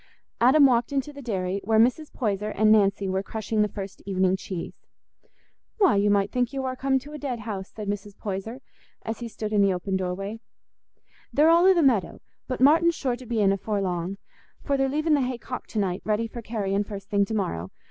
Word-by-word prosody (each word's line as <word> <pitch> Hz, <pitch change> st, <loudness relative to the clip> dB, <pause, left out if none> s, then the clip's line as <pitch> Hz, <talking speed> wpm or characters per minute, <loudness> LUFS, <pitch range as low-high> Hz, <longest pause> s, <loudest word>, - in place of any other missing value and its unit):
Adam 270 Hz, +5 st, +6 dB
walked 240 Hz, -2 st, +3 dB
into 280 Hz, +1 st, -2 dB
the 280 Hz, -, -9 dB
dairy, 195 Hz, -5 st, -2 dB
where 220 Hz, +2 st, +2 dB
Mrs. 255 Hz, +7 st, +2 dB
Poyser 210 Hz, -3 st, -2 dB
and 215 Hz, +1 st, +3 dB
Nancy 200 Hz, -2 st, +3 dB
were 190 Hz, 0 st, 0 dB
crushing 215 Hz, +1 st, -2 dB
the 210 Hz, -, +3 dB
first 195 Hz, -1 st, -8 dB
evening 190 Hz, -1 st, +1 dB
cheese. 185 Hz, -2 st, -6 dB, 1.0 s
"Why, 390 Hz, -, +4 dB
you 200 Hz, +1 st, +3 dB
might 200 Hz, -1 st, +2 dB
think 250 Hz, -1 st, 0 dB
you 270 Hz, -1 st, -3 dB
war 260 Hz, 0 st, -2 dB
come 265 Hz, +1 st, +1 dB
to 285 Hz, +3 st, -8 dB
a 300 Hz, -, -6 dB
dead 255 Hz, -5 st, -4 dB
house," 200 Hz, -3 st, -5 dB
said 210 Hz, -2 st, -8 dB
Mrs. 205 Hz, 0 st, -4 dB
Poyser, 215 Hz, +5 st, -5 dB, 0.4 s
as 225 Hz, 0 st, -4 dB
he 240 Hz, -, -5 dB
stood 215 Hz, -1 st, -5 dB
in 205 Hz, -, +4 dB
the 200 Hz, -1 st, +4 dB
open 190 Hz, +2 st, -3 dB
doorway; 195 Hz, +4 st, -4 dB, 0.9 s
"they're 310 Hz, +3 st, +5 dB
all 340 Hz, +2 st, +6 dB
i' 380 Hz, -, +7 dB
the 340 Hz, -3 st, +2 dB
meadow; 230 Hz, -10 st, +2 dB, 0.3 s
but 255 Hz, -, -3 dB
Martin's 325 Hz, +5 st, +5 dB
sure 255 Hz, -4 st, -1 dB
to 245 Hz, 0 st, -12 dB
be 225 Hz, -2 st, 0 dB
in 195 Hz, -1 st, +4 dB
afore 200 Hz, +1 st, -1 dB
long, 180 Hz, 0 st, -2 dB, 0.5 s
for 280 Hz, -, 0 dB
they're 270 Hz, 0 st, +1 dB
leaving 305 Hz, +3 st, +1 dB
the 290 Hz, -, +3 dB
hay 250 Hz, -1 st, -2 dB
cocked 250 Hz, +1 st, -7 dB
to -, -, -6 dB
night, 190 Hz, -3 st, 0 dB
ready 215 Hz, +1 st, 0 dB
for 235 Hz, +1 st, -7 dB
carrying 205 Hz, -3 st, -1 dB
first 200 Hz, -1 st, -9 dB
thing 200 Hz, -1 st, +3 dB
to 220 Hz, -, -4 dB
morrow. 85 Hz, -, -2 dB
220 Hz, 220 wpm, -25 LUFS, 195-260 Hz, 1.0 s, i